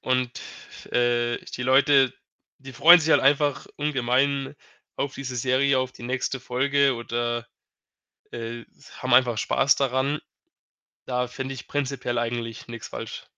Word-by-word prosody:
und, 130 Hz, -1 st, -1 dB, 0.5 s
äh, 120 Hz, -1 st, +1 dB, 0.2 s
die 125 Hz, -, -4 dB
Leute, 135 Hz, 0 st, +4 dB, 0.5 s
die 135 Hz, 0 st, -11 dB
freuen 170 Hz, +8 st, +8 dB
sich 160 Hz, +1 st, -1 dB
halt -, -, +5 dB
einfach 145 Hz, 0 st, +2 dB
ungemein 135 Hz, -1 st, 0 dB, 0.4 s
auf 140 Hz, -1 st, -3 dB
diese 130 Hz, -2 st, -6 dB
Serie, 130 Hz, +2 st, +2 dB
auf 130 Hz, 0 st, -2 dB
die -, -, -12 dB
nächste 130 Hz, +1 st, -2 dB
Folge 135 Hz, +2 st, +1 dB
oder, 120 Hz, 0 st, -3 dB, 0.9 s
äh, 115 Hz, 0 st, -6 dB, 0.3 s
haben -, -, +1 dB
einfach 120 Hz, -4 st, +4 dB
Spaß 135 Hz, +4 st, +2 dB
daran. 135 Hz, +2 st, 0 dB, 0.8 s
Da 125 Hz, -1 st, -1 dB
finde 135 Hz, +1 st, -5 dB
ich 125 Hz, -, -10 dB
prinzipiell 130 Hz, -4 st, -2 dB
eigentlich 115 Hz, -1 st, -4 dB
nix 115 Hz, -2 st, -8 dB
falsch. -, -, -7 dB
130 Hz, 135 wpm, -25 LUFS, 120-140 Hz, 0.9 s, freuen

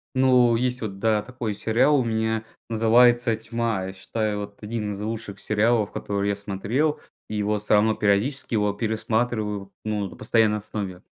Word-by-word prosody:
Ну 125 Hz, -2 st, +5 dB
есть 125 Hz, +1 st, -1 dB
вот, 100 Hz, -3 st, -5 dB
да, 110 Hz, -1 st, +2 dB
такой 120 Hz, -3 st, -4 dB
сериал 125 Hz, +8 st, +3 dB
у -, -, +1 dB
меня, 110 Hz, -1 st, -1 dB, 0.3 s
называется 115 Hz, +1 st, +4 dB
"Тьма". 115 Hz, -3 st, -2 dB
Я 95 Hz, -, -6 dB
считаю, 105 Hz, +2 st, -2 dB
вот 100 Hz, +1 st, -9 dB
один 105 Hz, -1 st, -3 dB
из 100 Hz, -, -7 dB
лучших 105 Hz, -2 st, -5 dB
сериалов, 110 Hz, 0 st, +1 dB
которые 100 Hz, 0 st, -2 dB
я 100 Hz, -, 0 dB
смотрел, 105 Hz, +10 st, -1 dB, 0.3 s
его, 105 Hz, 0 st, 0 dB
всё 105 Hz, -, 0 dB
равно, 110 Hz, +1 st, +4 dB
периодически 110 Hz, +7 st, 0 dB
его 105 Hz, -2 st, +2 dB
пересматриваю, 110 Hz, -2 st, -1 dB
ну, 105 Hz, -2 st, -2 dB
на -, -, -12 dB
постоянной 110 Hz, -2 st, +2 dB
основе. 100 Hz, -3 st, -5 dB
110 Hz, 160 wpm, -24 LUFS, 105-115 Hz, 0.3 s, Ну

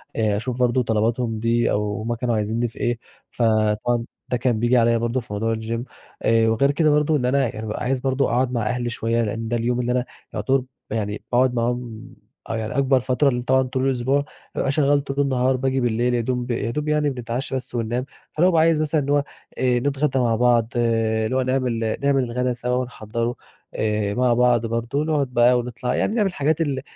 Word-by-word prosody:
آآ، 105 Hz, -2 st, +1 dB
أشوف 125 Hz, +2 st, -4 dB
برضه 125 Hz, 0 st, +2 dB
طلباتهُم 115 Hz, +1 st, 0 dB
دي، 115 Hz, +1 st, +1 dB
أو 105 Hz, 0 st, -1 dB
هُم 115 Hz, +2 st, -2 dB
كانوا 120 Hz, 0 st, -1 dB
عايزينّي 110 Hz, +3 st, 0 dB
في 115 Hz, -, -13 dB
إيه، 120 Hz, -1 st, 0 dB, 0.3 s
فطبعًا 115 Hz, +1 st, +1 dB, 0.2 s
ده 125 Hz, -, +1 dB
كان 120 Hz, -2 st, 0 dB
بييجي 120 Hz, +2 st, +3 dB
عليّ 115 Hz, -1 st, +3 dB
برضه 120 Hz, +2 st, 0 dB
في 120 Hz, -3 st, -9 dB
موضوع 115 Hz, +2 st, 0 dB
الgym، 115 Hz, +1 st, -4 dB, 0.4 s
آآ 115 Hz, 0 st, +3 dB
وغير 140 Hz, +5 st, +3 dB
كده 155 Hz, +2 st, +2 dB
برضه 150 Hz, +1 st, +3 dB
إن 125 Hz, -, -1 dB
أنا 135 Hz, +1 st, +2 dB
يعني 110 Hz, -2 st, -6 dB
بابقى 105 Hz, -, -4 dB
عايز 130 Hz, +1 st, 0 dB
برضه 135 Hz, +1 st, +1 dB
أقعد 125 Hz, +1 st, +1 dB
مع 120 Hz, -2 st, -1 dB
أهلي 120 Hz, -1 st, -1 dB
شوية، 115 Hz, 0 st, -1 dB
لأن 115 Hz, +1 st, -3 dB
ده 120 Hz, +1 st, 0 dB
اليوم 120 Hz, +1 st, 0 dB
اللي 125 Hz, 0 st, 0 dB
أنا 125 Hz, 0 st, 0 dB, 0.3 s
يُعتبر 135 Hz, 0 st, +1 dB
ب 130 Hz, -, -9 dB, 0.3 s
يعني 105 Hz, -1 st, -3 dB
باقعد 125 Hz, +1 st, +3 dB
معاهم 120 Hz, -1 st, -2 dB, 0.4 s
آه 115 Hz, -, -1 dB
يعني 110 Hz, +3 st, -4 dB
أكبر 135 Hz, -1 st, +3 dB
فترة، 130 Hz, +3 st, +2 dB
لأن 125 Hz, -2 st, -1 dB
طبعًا 130 Hz, +2 st, +3 dB
طول 130 Hz, 0 st, -2 dB
الأسبوع 135 Hz, +2 st, +1 dB, 0.3 s
بابقى 135 Hz, -, 0 dB
شغّال 145 Hz, -1 st, +2 dB
طول 140 Hz, 0 st, -4 dB
النهار 130 Hz, -2 st, +2 dB
باجي 135 Hz, +1 st, 0 dB
بالليل 120 Hz, +1 st, +1 dB
يادوب 120 Hz, +1 st, -1 dB
يادوب 120 Hz, +6 st, -2 dB
يعني 150 Hz, -1 st, +2 dB
بنتعشّى 125 Hz, +1 st, -4 dB
بس 125 Hz, -1 st, -5 dB
وننام، 120 Hz, +2 st, -1 dB, 0.3 s
فأنا 165 Hz, -, +2 dB
بابقى 165 Hz, -3 st, +4 dB
عايز 160 Hz, -1 st, +3 dB
مثلًا 155 Hz, 0 st, +1 dB
اللي 140 Hz, +1 st, -2 dB
هو 145 Hz, -1 st, +3 dB, 0.3 s
آآ 125 Hz, -1 st, +2 dB
نتغّدى 140 Hz, +1 st, 0 dB
مع 120 Hz, -2 st, +2 dB
بعض 120 Hz, -1 st, +3 dB
اللي 115 Hz, -1 st, +1 dB
هو 130 Hz, -, +2 dB
نعمل 125 Hz, -4 st, 0 dB
نعمل 140 Hz, -1 st, +3 dB
الغدا 125 Hz, +1 st, -1 dB
سوا 125 Hz, +1 st, -2 dB
ونحضّره 115 Hz, -1 st, -3 dB, 0.4 s
آآ، 105 Hz, -1 st, -1 dB
مع 125 Hz, +1 st, +2 dB
بعض 120 Hz, -1 st, +3 dB
برضه 115 Hz, +5 st, -1 dB
نقعد 150 Hz, -3 st, 0 dB
بقى 120 Hz, +1 st, +5 dB
ونطلع، 125 Hz, +1 st, -3 dB
يعني 215 Hz, -, 0 dB
نعمل 210 Hz, -4 st, +2 dB
الحاجات 155 Hz, -1 st, 0 dB
ال 140 Hz, -4 st, -1 dB
125 Hz, 205 wpm, -22 LUFS, 115-130 Hz, 0.4 s, بقى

